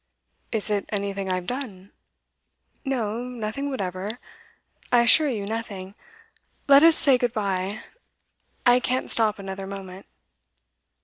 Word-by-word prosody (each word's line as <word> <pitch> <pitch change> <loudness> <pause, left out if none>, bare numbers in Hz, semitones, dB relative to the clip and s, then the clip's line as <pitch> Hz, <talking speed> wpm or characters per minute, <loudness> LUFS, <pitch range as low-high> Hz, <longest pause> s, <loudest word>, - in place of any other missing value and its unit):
'Is 215 -1 -1
it 205 -2 0
anything 200 -2 -2
I've 185 -1 -2
done?' 210 -7 -6 0.9
'No 235 -6 -2
nothing 245 +2 -4
whatever. 200 -2 -4 0.7
I 240 -1 +5
assure 295 +6 +5
you, 215 -6 -3
nothing. 200 -3 -5 0.7
Let 280 0 +8
us 330 0 +7
say 270 -5 +5
good 245 -1 0
bye; 200 -1 -2 0.8
I 245 0 +6
can't 255 +1 -1
stop 220 -2 +4
another 195 -1 -6
moment. 195 -1 -8
215 Hz, 120 wpm, -25 LUFS, 195-245 Hz, 0.9 s, Let